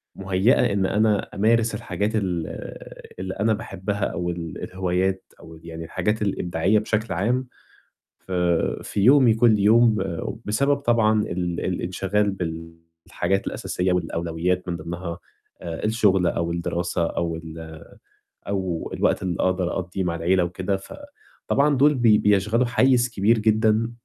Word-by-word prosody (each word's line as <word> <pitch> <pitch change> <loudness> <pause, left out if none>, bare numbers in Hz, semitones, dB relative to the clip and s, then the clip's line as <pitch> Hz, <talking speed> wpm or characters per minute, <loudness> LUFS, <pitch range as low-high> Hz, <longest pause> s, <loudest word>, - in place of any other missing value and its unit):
مهيّأة 100 +5 +2
إن 95 -1 +1
أنا 105 0 +1
أمارس 110 +2 +2
الحاجات 100 +1 -2
ال 90 -6 -1 0.7
اللي 95 0 -4
أنا 110 +2 +1
باحبها 100 -2 -4
أو 85 0 -3
ال 85 -2 -6
الهوايات 95 0 -1 0.2
أو 80 -1 -13
يعني 80 0 -7
الحاجات 105 +6 -1
الإبداعية 95 0 +1
بشكل 110 +1 -2
عام 120 +8 0 0.7
ف 95 - -11 0.5
في 105 - -3
يومي 125 +1 +6
كل 110 -1 +4
يوم 110 +2 +5 0.5
بسبب 140 +7 +1
طبعًا 115 -5 +2
ال 90 -3 -3
الانشغال 95 +3 -1
بالحاجات 85 +1 -4
الأساسية 90 0 -2
والأولويّات 85 +1 -1
من 85 - -2
ضِمنها 85 +1 -6 0.4
آآ 85 +3 -5
الشُغل 105 -5 +2
أو 85 0 -1
الدراسة 85 0 -1
أو 85 -1 -2
ال 80 -1 -9 0.7
أو 95 -4 -3
الوقت - - +1
اللي 90 -2 -2
أقدر 90 -1 0
أقضّيه 95 +1 -3
مع 85 -2 -1
العِيلة 90 +2 +2
وكده، 95 +3 -2
فطبعًا 150 - -3
دُول 145 +2 +4
بي 115 -4 +5
بيشغلوا 105 +4 +2
حيّز 125 0 +3
كبير 110 +1 +2
جدًا 110 +1 +2
95 Hz, 130 wpm, -23 LUFS, 85-110 Hz, 0.7 s, يومي